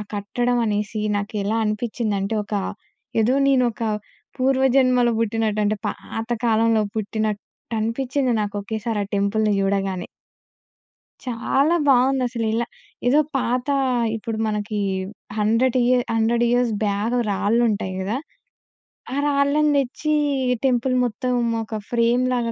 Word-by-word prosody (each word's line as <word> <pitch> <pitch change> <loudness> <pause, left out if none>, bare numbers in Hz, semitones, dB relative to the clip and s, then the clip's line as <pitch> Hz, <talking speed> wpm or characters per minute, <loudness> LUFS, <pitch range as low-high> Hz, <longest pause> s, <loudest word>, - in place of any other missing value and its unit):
కట్టడం 240 +4 0
అనేసి 210 +1 -1 0.2
నాకెలా 205 +1 -2
అనిపిచ్చిందంటే 215 -1 -1
ఒక 210 - -5 0.7
ఏదో 245 +4 +2
నేను 260 -2 +4
ఒక 220 - -8 0.6
పూర్వజన్మలో 260 -2 +3
పుట్టినట్టు 220 -1 0
అంటే 210 +1 +1
పాత 225 +1 -6 0.2
కాలంలో 225 0 +3
పుట్టినట్టనిపిచ్చింది 225 +4 -2
నాకు 205 0 -4
ఒకేసారి 220 +1 -3
ఆ - - -8
టెంపుల్‌ని 210 +1 +1
చూడగానే. 195 -2 -1 1.2
చాలా 265 +6 +1
బావుందసలిలా. 245 -3 +2 0.4
ఏదో 285 +5 +5 0.2
పాత 250 +1 -1 0.5
ఇప్పుడు 225 0 -4
మనకి 210 0 -2 0.6
హండ్రెడ్ 230 +4 +2
ఇయర్ 250 0 +3
100 230 +1 +2
ఇయర్స్ 245 -1 +2
బ్యాక్ 205 +4 0
రాళ్ళు 205 +4 +1
ఉంటాయి 200 -3 -2
కదా! 205 +6 -1 1.0
ఆ - - -2
రాళ్ళను 285 +1 +2
తెచ్చి 280 +3 -1 0.5
టెంపుల్ 255 0 +2
మొత్తం 250 +2 -2 0.3
ఒక 220 0 -5
ఫ్రేమ్‌లాగా 240 0 +1
230 Hz, 105 wpm, -22 LUFS, 210-250 Hz, 1.2 s, ఏదో